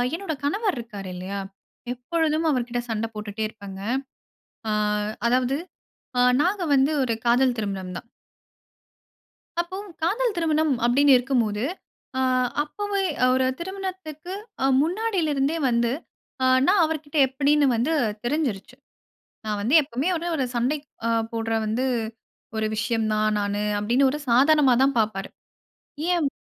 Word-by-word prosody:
என்னோட 350 Hz, -2 st, -3 dB
கணவர் 400 Hz, +7 st, 0 dB
இருக்கறாருல்லையா, 200 Hz, -4 st, -6 dB, 0.5 s
எப்பொழுதும் 315 Hz, +5 st, 0 dB
அவர்க்கிட்ட 245 Hz, -3 st, 0 dB
சண்ட 225 Hz, 0 st, -1 dB
போட்டுட்டே 210 Hz, 0 st, -4 dB
இருப்பேங்க. 200 Hz, -3 st, -10 dB, 0.9 s
ஆ -, -, +1 dB, 0.6 s
அதாவது 255 Hz, +2 st, +2 dB, 0.6 s
ஆ 245 Hz, -, +5 dB, 0.2 s
நாங்க 370 Hz, +3 st, +1 dB
வந்து 270 Hz, +2 st, +3 dB
ஒரு 240 Hz, -3 st, 0 dB
காதல் 245 Hz, +1 st, +4 dB
திருமணம் 195 Hz, -3 st, -4 dB
தான். -, -, -10 dB, 1.5 s
அப்பவும் 375 Hz, +3 st, -7 dB
காதல் 445 Hz, +7 st, +1 dB
திருமணம் 315 Hz, -3 st, +2 dB
அப்பிடின்னு 275 Hz, +3 st, +5 dB
இருக்கும்போது, 240 Hz, -5 st, 0 dB, 0.5 s
ஆ -, -, +1 dB, 0.4 s
அப்பவே 400 Hz, +5 st, -2 dB, 0.2 s
அ -, -, +7 dB
ஒரு 260 Hz, -, +2 dB
திருமணத்துக்கு 370 Hz, -3 st, -6 dB, 0.3 s
அ -, -, +4 dB, 0.2 s
முன்னாடிலருந்தே 330 Hz, -5 st, 0 dB
வந்து 235 Hz, -1 st, +2 dB, 0.5 s
அ -, -, +4 dB, 0.2 s
நான் 380 Hz, 0 st, +5 dB
அவர்கிட்ட 310 Hz, -1 st, -4 dB
எப்பிடின்னு 285 Hz, +2 st, +2 dB
வந்து 250 Hz, +8 st, +1 dB, 0.3 s
தெரிஞ்சிருச்சு. 250 Hz, -5 st, -2 dB, 0.7 s
நான் 210 Hz, -1 st, -2 dB
வந்து 240 Hz, +9 st, +2 dB
எப்பவுமே 275 Hz, +3 st, -2 dB
ஒரு 340 Hz, +2 st, -4 dB
ஒரு 270 Hz, -4 st, 0 dB
சண்டைக் 280 Hz, +5 st, 0 dB, 0.2 s
அ -, -, +1 dB, 0.2 s
போட்ற 225 Hz, 0 st, -2 dB
வந்து 225 Hz, +5 st, 0 dB, 0.7 s
ஒரு 220 Hz, -, 0 dB
விஷயம் 225 Hz, +1 st, 0 dB
நான் 215 Hz, 0 st, +1 dB
நானு 205 Hz, 0 st, -1 dB, 0.2 s
அப்பிடின்னு, 245 Hz, +6 st, +3 dB
ஒரு 300 Hz, -, -3 dB
சாதாரணமா 275 Hz, +2 st, +5 dB
தான் 275 Hz, +1 st, +2 dB
பார்ப்பாரு. 210 Hz, -3 st, -1 dB, 0.8 s
ஏன் 340 Hz, -4 st, +2 dB
265 Hz, 125 wpm, -24 LUFS, 225-320 Hz, 1.5 s, அ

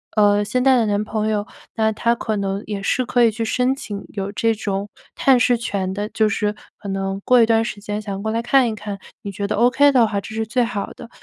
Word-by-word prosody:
呃， 205 Hz, -1 st, +4 dB
现 250 Hz, +4 st, 0 dB
在 265 Hz, 0 st, +5 dB
的 230 Hz, -, +2 dB
男 205 Hz, 0 st, 0 dB
朋 215 Hz, 0 st, -2 dB
友， 210 Hz, -1 st, -1 dB, 0.3 s
那 220 Hz, -1 st, +2 dB
他 230 Hz, +2 st, +1 dB
可 220 Hz, -2 st, -3 dB
能 195 Hz, 0 st, -2 dB
也 200 Hz, -2 st, -4 dB
是 255 Hz, -, +1 dB
可 245 Hz, 0 st, +2 dB
以 225 Hz, -, +5 dB
去 225 Hz, +2 st, -4 dB
申 250 Hz, +3 st, +1 dB
请 205 Hz, -6 st, -7 dB
有 200 Hz, -1 st, -4 dB
这 225 Hz, +2 st, +1 dB
种 200 Hz, -2 st, -3 dB, 0.3 s
探 265 Hz, -2 st, +4 dB
视 245 Hz, 0 st, +3 dB
权 195 Hz, -5 st, -2 dB
的， 205 Hz, +2 st, -3 dB
就 220 Hz, -1 st, +1 dB
是 210 Hz, +1 st, -1 dB, 0.2 s
可 205 Hz, -, -10 dB
能 195 Hz, 0 st, -2 dB
过 250 Hz, -1 st, +5 dB
一 225 Hz, -, +4 dB
段 225 Hz, 0 st, +3 dB
时 205 Hz, -3 st, -6 dB
间 210 Hz, 0 st, -4 dB
想 200 Hz, -2 st, -5 dB
过 220 Hz, +1 st, -2 dB
来 230 Hz, -, 0 dB
看 250 Hz, -1 st, +3 dB
一 220 Hz, -, -4 dB
看， 205 Hz, -2 st, -6 dB, 0.2 s
你 200 Hz, -, -5 dB
觉 200 Hz, +1 st, -3 dB
得 -, -, -1 dB
ok 250 Hz, +6 st, +4 dB
的 245 Hz, -4 st, +5 dB
话 205 Hz, -2 st, -2 dB
这 220 Hz, +3 st, -9 dB
是 220 Hz, 0 st, -1 dB
最 245 Hz, +3 st, +1 dB
好 230 Hz, -4 st, -4 dB
的。 230 Hz, -, -12 dB
215 Hz, 280 characters per minute, -21 LUFS, 205-235 Hz, 0.3 s, 在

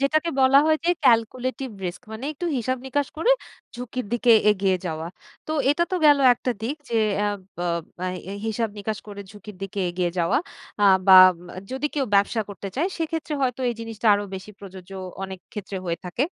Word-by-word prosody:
যেটাকে 310 Hz, +4 st, +1 dB
বলা 265 Hz, +1 st, +6 dB
হয় 315 Hz, 0 st, +4 dB
যেই 350 Hz, +1 st, +3 dB
calculated 255 Hz, +3 st, +1 dB
risk 175 Hz, 0 st, -4 dB
মানে 225 Hz, +5 st, -6 dB
একটু 345 Hz, +4 st, -5 dB
হিসাব 255 Hz, +2 st, -1 dB
নিকাশ 285 Hz, +1 st, -1 dB
করে 395 Hz, +10 st, +2 dB, 0.4 s
ঝুঁকির 250 Hz, -1 st, -5 dB
দিকে 240 Hz, 0 st, +4 dB, 0.2 s
এগিয়ে 190 Hz, -2 st, +1 dB
যাওয়া। 160 Hz, 0 st, -4 dB, 0.4 s
তো 310 Hz, -, -3 dB, 0.2 s
এটা 340 Hz, +4 st, +2 dB
তো -, -, +2 dB
গেলো 285 Hz, -2 st, +6 dB
একটা 250 Hz, -, -3 dB
দিক। 270 Hz, +7 st, -2 dB
যে, 230 Hz, -, 0 dB, 0.2 s
অ্যাব 205 Hz, -1 st, 0 dB, 0.2 s
বব 170 Hz, -1 st, -1 dB, 0.5 s
এই 200 Hz, -, -6 dB
হিসাব 225 Hz, +1 st, -1 dB
নিকাশ 210 Hz, +1 st, -3 dB
করে 200 Hz, -1 st, -8 dB
ঝুঁকির 210 Hz, -1 st, -12 dB
দিকে 195 Hz, 0 st, -4 dB
এগিয়ে 175 Hz, -1 st, -1 dB
যাওয়া 170 Hz, +8 st, +2 dB, 0.4 s
আ -, -, +6 dB, 0.2 s
বা 190 Hz, -1 st, +9 dB, 0.2 s
উম 175 Hz, +1 st, -15 dB, 0.2 s
যদি 265 Hz, +3 st, -1 dB
কেউ 280 Hz, -2 st, +1 dB
ব্যবসা 200 Hz, +3 st, +3 dB
করতে 195 Hz, 0 st, -7 dB
চায়। 340 Hz, +7 st, +1 dB
সেক্ষেত্রে 320 Hz, -1 st, -3 dB
হয়তো 255 Hz, 0 st, -1 dB
এই 240 Hz, -, -1 dB
জিনিসটা 225 Hz, 0 st, -5 dB
আরো 205 Hz, 0 st, -2 dB
বেশি 190 Hz, +2 st, -8 dB
প্রযোজ্য, 190 Hz, -1 st, -11 dB, 0.3 s
অনেক 190 Hz, -1 st, -6 dB
ক্ষেত্রে 200 Hz, -1 st, -6 dB
হয়ে 170 Hz, -1 st, -2 dB
থাকে। 210 Hz, +10 st, -1 dB
225 Hz, 185 wpm, -24 LUFS, 195-270 Hz, 0.5 s, বা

